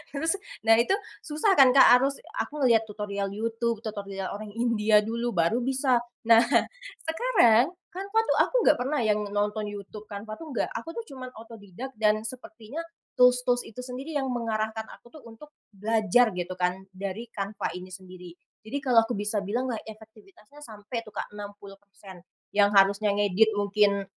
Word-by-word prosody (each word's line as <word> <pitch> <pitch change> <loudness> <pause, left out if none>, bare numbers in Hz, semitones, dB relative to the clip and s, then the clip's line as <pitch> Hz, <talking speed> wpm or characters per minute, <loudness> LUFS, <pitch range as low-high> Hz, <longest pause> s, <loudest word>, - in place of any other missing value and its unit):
Terus, 325 +7 0 0.2
nah 225 0 +5
itu 250 +12 +3 0.3
susah 310 +7 +1
kan, 260 -1 +7
Kak, 250 -2 +8
harus 275 +2 0 0.2
aku 295 -1 -3
ngelihat 225 -3 +4
tutorial 200 -1 -4
YouTube, 230 0 -2
tutorial 200 -3 -5
orang 215 +1 -6
India 215 -3 +3
dulu, 235 +1 -3
baru 170 +7 +2
bisa. 260 0 +1 0.3
Nah, 225 0 +7 0.6
sekarang, 320 - +4 0.3
Canva 400 +3 0
tuh - - +3
aku - - 0
nggak 300 - +5
pernah 280 +4 -1
yang 210 -1 +2
nonton 210 +1 -1
YouTube, 205 +1 -9
Canva 205 +1 -7
tuh 320 - -8
nggak. - - -1
Aku 230 +8 -6
tuh - - -2
cuman 255 -1 -7
otodidak 225 +2 -10
dan 215 0 +2
sepertinya 235 +1 -9 0.4
tools-tools 250 0 +4
itu 240 +3 -9
sendiri 265 +5 -7
yang 270 -1 -2
mengarahkan 220 -2 -2
aku 240 - -15
tuh - - -14
untuk 295 +7 -14 0.2
belajar, 220 +2 +2
gitu 180 0 -4
kan, 180 +1 -1
dari 200 +4 -6
Canva 200 0 -4
ini 180 +1 -9
sendiri. 180 -1 -11 0.3
Jadi 225 +6 -4
kalau 250 -3 +4
aku 240 - -3
bisa 210 +1 -2
bilanglah, 245 +3 -2
efektivitasnya 220 +3 -15
sampai 220 +2 -6
tuh, 215 - -12
Kak, - - -5
60% 200 -2 -12 0.3
yang 205 0 +5
harusnya 200 +1 +4
ngedit 205 +2 +3
mungkin, 200 -1 +2
220 Hz, 160 wpm, -27 LUFS, 205-250 Hz, 0.6 s, Kak